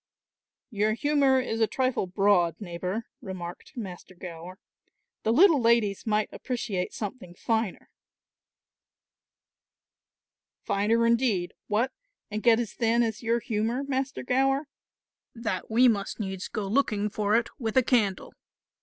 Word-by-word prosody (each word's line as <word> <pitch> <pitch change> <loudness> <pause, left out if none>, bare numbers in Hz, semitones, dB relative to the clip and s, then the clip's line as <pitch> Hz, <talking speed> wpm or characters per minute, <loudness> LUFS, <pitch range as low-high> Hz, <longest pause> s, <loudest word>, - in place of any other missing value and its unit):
"Your 215 0 +1
humour 280 0 +3
is 225 -3 -2
a 220 - +4
trifle 255 -6 0
broad, 180 -3 +2
neighbour," 185 +3 -4 0.2
remarked 185 - -8
Master 185 -4 -7
Gower; 175 +1 -9 0.6
"the 220 - +1
little 315 - +6
ladies 230 -3 +2
might 210 0 +2
appreciate 230 -8 -3
something 205 -5 -6
finer." 220 0 -1 2.8
"Finer 225 +4 +2
indeed 230 -7 +1
what, 225 +5 +1 0.4
and 215 +1 -2
get 230 0 +5
as 235 -4 -3
thin 235 +1 +2
as 225 -2 -2
your 235 0 +1
humour, 225 +5 -1
Master 270 -1 -2
Gower, 270 +3 +1 0.7
that 225 -5 -3
we 240 +3 +5
must 205 -3 0
needs 190 -3 -4
go 215 - -4
looking 210 -2 +1
for 210 0 0
it 235 0 +2
with 225 -1 -2
a 260 - +6
candle. 215 -7 +1
220 Hz, 125 wpm, -27 LUFS, 195-245 Hz, 2.8 s, little